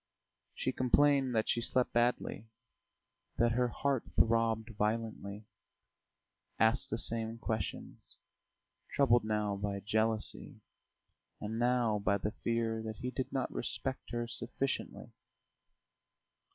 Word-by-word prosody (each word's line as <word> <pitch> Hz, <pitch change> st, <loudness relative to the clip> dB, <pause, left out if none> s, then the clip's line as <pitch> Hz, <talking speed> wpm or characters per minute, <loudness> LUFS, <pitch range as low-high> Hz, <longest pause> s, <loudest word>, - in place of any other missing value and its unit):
She 130 Hz, -, -1 dB
complained 135 Hz, 0 st, +3 dB
that 110 Hz, -, +2 dB
she 120 Hz, -, +1 dB
slept 125 Hz, +1 st, +1 dB
badly, 120 Hz, -2 st, +1 dB, 0.9 s
that 120 Hz, 0 st, +4 dB
her 125 Hz, +1 st, +2 dB
heart 135 Hz, +1 st, 0 dB
throbbed 115 Hz, 0 st, +2 dB
violently; 105 Hz, -1 st, -2 dB, 1.1 s
asked 110 Hz, +4 st, +3 dB
the 110 Hz, -, -1 dB
same 115 Hz, 0 st, -1 dB
questions, 110 Hz, -4 st, -4 dB, 0.8 s
troubled 120 Hz, -5 st, +5 dB
now 105 Hz, -1 st, 0 dB
by 100 Hz, 0 st, -2 dB
jealousy 110 Hz, +1 st, -1 dB, 0.8 s
and 110 Hz, +2 st, -3 dB
now 120 Hz, -3 st, +2 dB
by 100 Hz, 0 st, +2 dB
the 105 Hz, +2 st, -2 dB
fear 115 Hz, -1 st, -1 dB
that 110 Hz, -1 st, -5 dB
he 125 Hz, 0 st, -4 dB
did 130 Hz, +1 st, -3 dB
not 135 Hz, -2 st, -1 dB
respect 135 Hz, 0 st, -2 dB
her 120 Hz, 0 st, -2 dB
sufficiently. 120 Hz, +3 st, -2 dB
115 Hz, 110 wpm, -33 LUFS, 110-125 Hz, 1.1 s, troubled